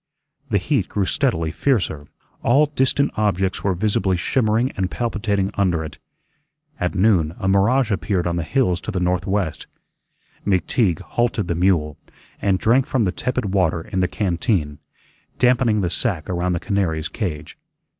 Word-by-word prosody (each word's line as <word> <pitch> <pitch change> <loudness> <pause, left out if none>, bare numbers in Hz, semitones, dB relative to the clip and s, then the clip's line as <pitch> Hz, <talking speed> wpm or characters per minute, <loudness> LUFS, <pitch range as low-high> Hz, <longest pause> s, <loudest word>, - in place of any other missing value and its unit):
The - - +2
heat - - 0
grew 100 -2 0
steadily 80 -3 0
fiercer; 80 - 0 0.3
all 135 +6 +4
distant 140 0 +1
objects 95 -3 0
were 95 -2 +1
visibly 95 -1 +1
shimmering 115 +5 +1
and 95 -1 -2
palpitating 100 -4 -1
under 90 -5 +1
it. 75 - -9 0.8
At 90 +2 -1
noon 90 -5 +2
a 95 - -3
mirage 105 +6 +3
appeared 95 -2 0
on 85 -1 0
the 85 - -1
hills 90 - +1
to - - -7
the 100 -4 -1
northwest. 90 0 -1 0.8
McTeague 95 -1 +1
halted 115 -5 -1
the - - +2
mule, 85 -4 +1 0.4
and 95 -2 +2
drank 125 +7 +2
from 130 -4 +1
the 90 - +1
tepid 125 -3 -2
water 85 -4 +1
in 95 +1 -4
the 90 - +2
canteen, 85 - -1 0.6
dampening 125 -4 +3
the 90 - 0
sack 80 -5 -1
around 90 0 -1
the 85 - -1
canary's 85 -6 -1
cage. 75 -9 -5
95 Hz, 155 wpm, -21 LUFS, 85-110 Hz, 0.8 s, all